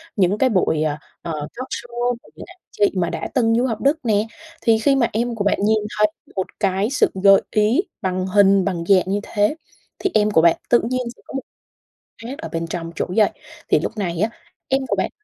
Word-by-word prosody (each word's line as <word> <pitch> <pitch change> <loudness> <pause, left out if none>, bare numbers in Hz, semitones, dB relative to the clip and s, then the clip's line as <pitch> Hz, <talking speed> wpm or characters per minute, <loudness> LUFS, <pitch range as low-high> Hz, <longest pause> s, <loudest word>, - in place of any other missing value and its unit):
những 195 0 +2
cái 260 +3 +3
buổi, 180 -7 +1
à, 150 -1 -1 0.2
ờ, 170 - -5 0.2
talkshow 240 -1 -3
của - - -20
những - - -9
anh 365 +1 -15
chị 205 - +2
mà 175 -2 0
đã - - -4
từng 225 -3 +3
du 245 - +2
học 225 -4 -2
Đức 285 +3 +2
nè, 215 -1 +2 0.3
thì 225 -2 +3
khi 275 +5 +3
mà 250 -4 +3
em 235 +2 -1
của 210 - -2
bạn 200 - +2
nhìn 215 +2 +3 0.2
thấy 210 - +6 0.3
một 190 -1 -1
cái 195 +1 +1
sự 270 - +2
gợi 195 -1 +7
ý 215 +8 +3 0.2
bằng 185 0 -1
hình 195 -1 +4
bằng 180 -4 -2
dạng 190 0 +5
như 195 +2 -1
thế 210 +7 +1 0.4
thì 390 - 0
em 210 0 +3
của 160 - +5
bạn 170 0 +5
tự 240 - +5
nhiên 255 0 0
sẽ - - -24
có - - -12
một 270 - -2 0.8
khác 255 +5 -6
ở 320 - -7
bên 165 0 -3
trong 165 0 -5
chỗ - - -1
dạy, 215 -2 +4 0.4
thì - - +4
lúc 225 - -4
này 175 -5 -2
á 215 +4 +2 0.4
em 270 +1 +1
của - - 0
bạn - - 0
210 Hz, 230 wpm, -21 LUFS, 190-240 Hz, 0.8 s, gợi